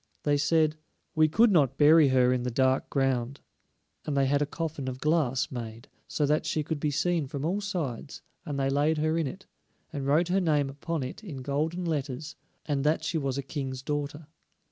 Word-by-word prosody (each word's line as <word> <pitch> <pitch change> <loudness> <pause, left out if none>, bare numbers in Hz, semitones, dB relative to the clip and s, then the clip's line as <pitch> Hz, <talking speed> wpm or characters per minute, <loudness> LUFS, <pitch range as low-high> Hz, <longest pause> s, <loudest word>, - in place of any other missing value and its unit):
They 145 -1 +2
said: 155 +1 +2 0.4
"We 155 -1 +4
could 220 +8 +4
not 140 -7 +3
bury 155 +1 +7
her 125 -1 +4
in 125 - -1
the 125 - -2
dark 130 +2 +1
ground," 135 -1 0 0.6
and 145 -2 -2
they 135 - +3
had 140 +2 +2
a 145 - +1
coffin 155 -3 -4
of 130 0 -4
glass 150 -5 +1
made, 115 -2 -7 0.2
so 150 - 0
that 150 +2 +1
she 155 0 0
could 155 0 -3
be 150 - 0
seen 160 +1 0
from 140 0 -4
all 190 +5 0
sides, 160 - -4 0.2
and 145 -4 -4
they 135 0 +1
laid 150 +3 +2
her 155 +1 +1
in 165 -3 0
it, 190 +8 -8 0.5
and 140 -2 -3
wrote 160 +5 +3
her 190 +2 +2
name 150 -5 +1
upon 145 +2 -3
it 130 - -7
in 140 -10 -7
golden 155 +6 -1
letters, 150 -1 -3 0.3
and 140 -3 -1
that 155 +2 +1
she 160 +1 -1
was 135 -2 -2
a 140 - -2
King's 130 -2 -5
daughter. 145 +1 -3
145 Hz, 205 wpm, -28 LUFS, 135-160 Hz, 0.6 s, bury